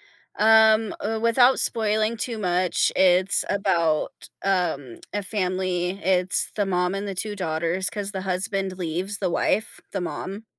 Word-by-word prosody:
Yeah, 220 0 +4
um, 215 -1 -4
uh, 220 +1 -2
without 245 +3 +4
spoiling 220 0 0
too 230 +1 -3
much, 180 -2 +1
it's 185 +1 +3
about, 170 -6 +1 0.3
um, 170 -10 -1
a 205 -1 -2
family. 185 -2 -1
It's 185 0 +1
the 205 - 0
mom 180 -1 0
and 200 +1 -4
the 195 - -4
2 205 +3 -3
daughters 170 +1 -1
'cause 205 -1 -4
the 190 -2 -4
husband 195 0 -2
leaves 180 +4 -3
the 185 -3 0
wife, 210 +5 0
the 195 - -3
mom 195 +4 -6
190 Hz, 155 wpm, -24 LUFS, 180-210 Hz, 0.3 s, Yeah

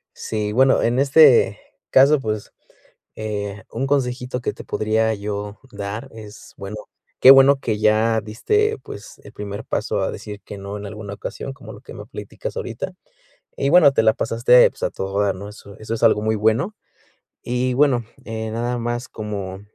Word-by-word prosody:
Sí, 105 -1 -3
bueno, 130 +3 +4
en 120 +3 +1
este 140 -2 +5 0.3
caso, 140 +3 +6
pues, 110 -4 -4 0.6
eh, 105 -1 -5
un 130 +4 -2
consejito 125 -2 -1
que - - -2
te - - -11
podría 110 +1 0
yo 105 0 -5
dar, 100 +2 -6
es, 110 -1 -12
bueno 100 +2 -7 0.4
Qué 130 - +10
bueno 135 +1 +7
que 110 -5 -2
ya 110 +1 +3
diste, 425 - 0
pues, - - -11
el - - -12
primer 105 +1 -7
paso - - -2
a - - 0
decir 105 -1 -8
que, 105 - -9
no, 100 +1 -6
en 105 - -8
alguna 105 -1 -7
ocasión, 135 - -6
como 140 - -12
lo - - -13
que - - -12
me - - -9
platicas - - -8
ahorita - - -5 0.7
y 140 - +1
bueno, 160 -4 +7
te - - +2
la 110 0 +5
pasaste 120 +2 +4
pues - - -19
a - - 0
todo 95 +1 -3
dar, 100 -2 +1
¿no? 100 +2 -8
Eso 100 -1 -13
es 110 +1 -5
algo 115 -2 +4
muy 110 0 0
bueno. 110 - +1 0.7
Y 125 +1 -1
bueno, 135 -3 +3 0.2
eh, 110 -1 -4
nada 120 +2 -2
más 120 +2 -3
como, 100 -3 -6
110 Hz, 180 wpm, -21 LUFS, 105-125 Hz, 0.7 s, Qué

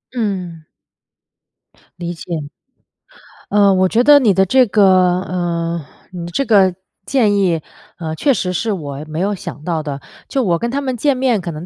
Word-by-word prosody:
嗯。 185 -8 -3 1.4
理 175 0 -4
解。 165 -2 -5 1.1
呃， 200 -1 +4
我 185 0 +3
觉 230 +5 +2
得 290 +1 +7
你 225 -7 +3
的 190 +1 +3
这 255 +7 +4
个， 205 +1 +3 0.4
呃， 170 -3 -3 0.3
你 175 -2 -6
的 170 - -8
这 275 +9 -1
个 195 -6 +4 0.3
建 220 -6 +2
议， 180 -5 +1 0.4
呃， 160 -2 -5
确 275 - +2
实 180 -6 -2
是 220 +5 -1
我 145 -7 -5
没 155 +1 -5
有 200 +3 0
想 150 -5 -8
到 165 -3 -2
的。 145 -2 -5 0.3
就 270 - 0
我 175 -6 +1
跟 235 +6 -3
他 275 - -1
们 260 -2 -2
见 270 +3 +1
面 250 -5 +1
可 175 -1 -5
能 155 +2 -8
185 Hz, 190 characters per minute, -17 LUFS, 170-230 Hz, 1.4 s, 得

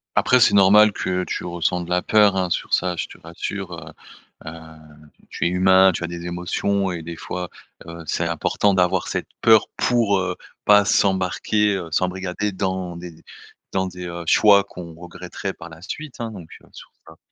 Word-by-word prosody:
Après, 125 - +4
c'est 120 - +5
normal 100 +2 +6
que 90 -1 -2
tu - - -4
ressens 90 +1 -1
de 85 - -8
la 90 0 +1
peur, 105 -1 +4
hein, 90 -1 0
sur - - -3
ça, 90 0 +1
je 85 - -3
te - - -14
rassure, 90 +3 -6
heu 85 - -10 0.5
heu, - - -5 0.8
tu - - -3
es 85 - +3
humain, 95 +1 +5
tu 85 - -5
as - - -2
des 85 0 -7
émotions 95 +2 -1
et 85 -2 -5
des 85 +1 -7
fois, 90 +1 -6 0.4
heu, 85 0 -9
c'est - - -1
important 100 -1 0
d'avoir 90 0 +1
cette - - -3
peur 110 -2 +5
pour, 115 -5 +2
heu, 90 -1 -2 0.3
pas 105 -1 +6
s'embarquer, 100 +2 +1
heu, 90 -4 -5
s'embrigader 95 +4 -2
dans 95 -2 -3
des 85 -2 -11 0.5
dans 95 0 0
des, 90 0 -8
heu, 85 0 -6
choix 100 +1 +5
qu'on 90 -4 -10
regretterait 90 +2 -7
par 80 - -11
la 80 0 -14
suite, 145 +8 -7
hein, 115 -1 -4
donc 90 -6 -11
heu, - - -21
sur - - -13 0.2
ça 80 0 -15
90 Hz, 190 wpm, -21 LUFS, 85-100 Hz, 0.8 s, normal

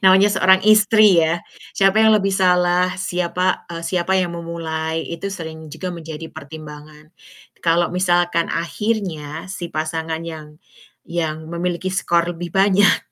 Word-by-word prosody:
namanya 190 +2 +6
seorang 190 -1 +4
istri 215 -2 +6
ya, 165 +2 0 0.3
siapa 195 +2 +3
yang 220 - +6
lebih 195 -1 +1
salah, 180 -1 +3
siapa 180 0 -1
eee, 165 - -5
siapa 180 0 -1
yang 175 -2 -2
memulai 165 -1 -4
itu 170 +4 -5
sering 160 -4 -8
juga 185 - -5
menjadi 160 -1 -8
pertimbangan. 150 0 -11 0.6
Kalau 170 +1 +3
misalkan 175 -2 +1
akhirnya 165 -3 -3
si 175 -3 -6
pasangan 160 +1 -3
yang 155 -2 -9 0.5
yang 160 -2 -3
memiliki 175 +2 -2
skor 175 -2 +1
lebih 175 0 -7
banyak 195 +1 +4
170 Hz, 135 wpm, -20 LUFS, 160-185 Hz, 0.6 s, namanya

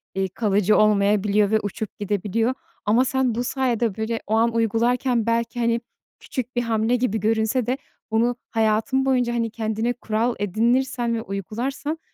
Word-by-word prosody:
iii, 190 0 0
kalıcı 205 0 +2
olmayabiliyor 205 0 +3
ve 220 - +4
uçup 205 0 -6
gidebiliyor 210 +4 0 0.3
ama 230 +5 +4
sen 260 -3 0
bu 240 - -1
sayede, 240 -5 0
böyle, 220 +1 -2
o 215 - -1
an 230 +1 +3
uygularken 230 +1 +1
belki, 230 +1 0
hani, 235 0 +1 0.4
küçük 255 -2 -5
bir 245 - +2
hamle 225 0 +1
gibi 240 -3 0
görünse 220 +3 +1
de 255 +3 0 0.3
bunu 235 +2 +2
hayatın 225 +4 +1
boyunca, 250 -3 +2
hani, 230 -1 0
kendine 220 +1 -1
kural 230 0 -1
edinirsen 235 +4 +1
ve 225 - -2
uygularsan 240 - -4
230 Hz, 155 wpm, -23 LUFS, 215-245 Hz, 0.4 s, ve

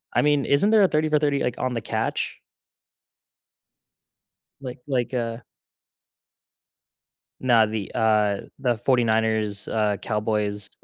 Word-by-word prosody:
I - - +4
mean, 145 -2 +2
isn't 145 +9 +3
there 220 -1 +5
a 195 - +6
30 155 -2 0
for 150 - +3
30, 145 -2 0
like 125 - -1
on 130 -1 -2
the 115 - -3
Catch? - - -3 2.2
Like, 125 -2 -7
like, 130 -2 -1
uh 115 -2 -2 2.0
Now, 120 -4 +4
the, 110 -2 -5
uh, 105 -2 +2 0.2
the 125 -4 0
Forty-Niners, 110 -4 0
uh, 105 -2 0
Cowboys. 105 -2 -2
115 Hz, 120 wpm, -24 LUFS, 110-135 Hz, 2.2 s, a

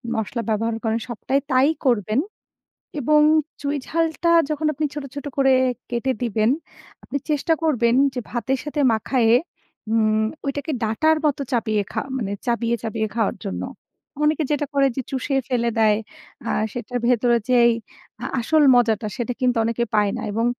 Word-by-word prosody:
মশলা 225 +2 -2
ব্যবহার 225 +1 0
করেন, 225 0 0
সবটাই 250 +4 -1
তাই 260 +3 +4 0.2
করবেন। 220 -1 +2 0.8
এবং 300 +3 +4 0.4
চুঁই 285 +1 -1
ঝালটা 330 +1 0 0.2
যখন 305 0 -1
আপনি 305 +2 -3
ছোট, 295 -2 -5
ছোট, 285 0 -6
করে 270 -1 +4 0.4
কেটে 245 +2 0
দিবেন, 220 -1 +1 0.5
আপনি - - -5
চেষ্টা 300 +2 +2
করবেন 240 -7 +2 0.2
যে 250 - -2
ভাতের 245 +3 -1
সাথে 295 0 -3
মাখায়ে 225 +1 +2 0.6
উম! 220 -1 +2 0.2
ওইটাকে 285 +2 -3
ডাঁটার 270 +9 +2
মতো 285 -1 0
চাপিয়ে 220 -3 +1
খা - - -1
মানে 210 -6 -3
চাবিয়ে, 235 -1 +1
চাবিয়ে, 220 -1 -2
খাওয়ার 225 -3 0
জন্য। 195 - -3 0.6
অনেকে 305 +1 +2
যেটা 295 0 0
করে 275 -1 +4
যে 265 - -1
চুষে 270 +1 -2
ফেলে 235 -2 +1
দেয় 215 -1 +4 0.5
আ - - 0 0.2
সেটার 245 +1 -4
ভেতরে 240 0 +3
যেই 240 -1 +6 0.5
আ - - -3 0.2
আসল 310 +6 +3
মজাটা 225 -3 +2
সেটা 245 -1 -2
কিন্তু 250 -1 +2
অনেকে 230 +1 0
পায় 210 -1 +3
না। - - -5
এবং 225 +2 0
245 Hz, 155 wpm, -22 LUFS, 225-280 Hz, 0.8 s, যেই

